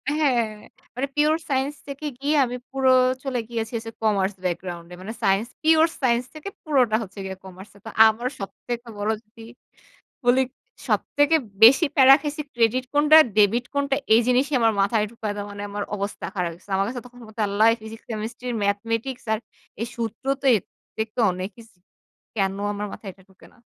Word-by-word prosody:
হ্যাঁ। 265 -7 +2 0.5
মানে 265 +3 -1
pure 300 +1 +3
science 275 +2 -1
থেকে 280 +2 -7
গিয়ে 290 +2 +1
আমি 245 0 -5 0.2
পুরো 265 -1 +2 0.3
চলে 260 -3 -2
গিয়েছি 225 -1 -3
হচ্ছে 225 0 -7
commerce 200 -2 +1
background 175 -1 -3
এ - - -7
মানে 210 +4 -6
সাইন্স 195 +4 +2 0.2
pure 320 +1 +5
science 245 -1 +1
থেকে 310 +6 -6
পুরোটা 255 -8 +2
হচ্ছে 200 0 -11
গিয়ে 190 0 -6
কমার্স 190 +1 -12
এ। - - -18
তো - - -6 0.2
আমার 225 +3 -1
সবথেকে 235 +4 -6
বলজগি 220 +2 -4 0.8
বলি 245 +2 +4 0.5
সবথেকে 290 +2 +2 0.3
বেশি 270 +9 +8
প্যারা 270 -1 +9
খাইছি 295 +1 -4
credit 240 +2 +2
কোনটা, 300 +1 +6 0.2
debit 215 +3 +4
কোনটা? 280 -1 +1 0.2
এই 225 - +6
জিনিসই 260 +4 +2
আমার 225 -1 +4
মাথায় 210 +2 +2
ঢুকাইতে 210 -3 -5
মানে 205 0 -7
আমার 205 0 -3
অবস্থা 200 0 -5
খারাপ 180 -3 -1
হয়ে 165 - -10
গেছে। 185 - -19
আমার 195 +1 +1
কাছে 245 +1 -5
তখন 245 0 -16 0.3
আল্লাহ 205 +2 +3
physics, 220 +1 -10
chemistry, 225 +3 -5 0.2
mathematics 230 +5 -2
আর 220 - +1 0.4
এই 230 - -1
সূত্রতো 260 +5 -3
এত 195 - -5 0.3
দেখতে 220 +2 -2
অনেকইছ 195 +5 -7 0.7
"কেন 195 -2 +1 0.2
আমার 205 +1 -4
মাথায় 200 - -8
এটা 190 - -22
ঢোকে 190 - -19
না?" - - -25
230 Hz, 170 wpm, -24 LUFS, 205-265 Hz, 0.8 s, প্যারা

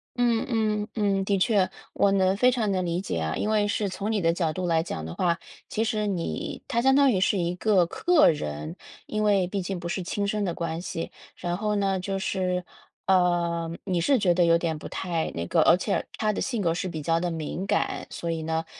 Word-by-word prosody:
嗯， 240 -2 +2
嗯， 215 -2 0
嗯， 200 -3 +1
的 200 0 +1
确， 195 -1 +3 0.2
我 200 - +3
能 190 -1 +3
非 250 +5 +4
常 225 -5 0
能 185 -1 0
理 170 +1 -1
解 185 - -3
啊， 80 0 -2
因 215 - -1
为 210 -1 +2
是 205 0 0
从 200 +3 -3
你 215 - +1
的 165 0 +3
角 170 -3 0
度 180 +3 -3
来 165 -1 +2
讲 80 - -5
的 80 - -6
话， 170 0 +1 0.3
其 220 - 0
实 215 -2 0
你 180 -4 -3
她 235 - +1
相 265 +1 +4
当 280 -2 +5
于 185 -3 +1
是 195 - +2
一 175 0 -1
个 195 -2 +3
客 310 - +4
人， 75 - -5 0.3
因 215 0 -2
为 200 -3 +3
毕 195 +1 -2
竟 185 0 -4
不 170 - -5
是 180 +1 -2
亲 200 +3 -2
生 210 0 -1
的 175 -3 -1
关 165 0 -3
系。 165 -2 -5 0.3
然 175 -1 -2
后 210 +2 -1
呢， 195 -2 +1
就 195 +1 -2
是， 180 -2 -1 0.4
呃， 175 -3 +2
你 180 -3 0
是 265 +9 +3
觉 180 -4 +3
得 175 0 +3
有 170 0 +5
点 165 -2 -2
不 - - -8
太 170 -4 -2
那 85 - -2
个 - - +3
而 175 - +6
且 200 +2 -1
她 215 -1 +1
的 - - -3
性 240 -6 -1
格 165 -3 +1
是 180 +2 -3
比 160 -3 -5
较 165 +2 +1
地 175 0 -1
敏 165 +4 -4
感， - - -1
所 170 - -5
以 165 -1 -2
呢 160 +1 -2
185 Hz, 250 characters per minute, -26 LUFS, 170-210 Hz, 0.4 s, 而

